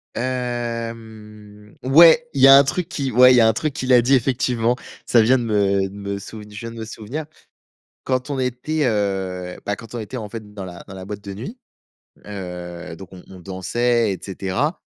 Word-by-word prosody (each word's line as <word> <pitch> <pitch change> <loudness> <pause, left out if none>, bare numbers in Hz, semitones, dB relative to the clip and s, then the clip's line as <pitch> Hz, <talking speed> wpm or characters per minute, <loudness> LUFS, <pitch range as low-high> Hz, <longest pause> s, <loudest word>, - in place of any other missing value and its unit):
Hem, 115 -4 -5
ouais, 165 - +6
il 135 - -1
y 135 - +9
a 135 - +10
un 140 - +8
truc 165 +5 -2
qui 140 -6 -3
ouais, 125 +2 +7
il - - +5
y 120 - +6
a 110 - +6
un 110 - +3
truc 150 +5 -2
qu'il 130 -4 -2
a 120 - +7
dit, 130 +3 +2
effectivement, 125 -2 +1 0.3
ça 120 - +5
vient 125 +3 +4
de - - -3
me 100 -3 +1
de 100 - -13
me 100 0 -5
souv 105 +2 -9
je 105 -1 -10
viens 115 - -6
de - - -11
me 110 - -5
souvenir. 115 +8 -6 0.8
Quand 130 +1 -1
on 140 - -2
était, 130 +4 -1
heu, 95 -5 -2
bah, 100 - -1
quand 115 +1 -11
on - - -3
était, 110 +4 -6
en 110 -3 -5
fait, 105 -1 -9
dans 100 -2 -7
la 90 -1 -10
dans - - -8
la 95 0 -8
boîte 100 0 -7
de 100 - -7
nuit, 125 - -8 0.7
heu, 90 -4 -7
donc 95 +1 -11
on 90 -1 -11
on 95 -1 -12
dansait 110 +5 0
et 95 - -5
cetera 100 - -2
115 Hz, 215 wpm, -21 LUFS, 100-125 Hz, 0.8 s, a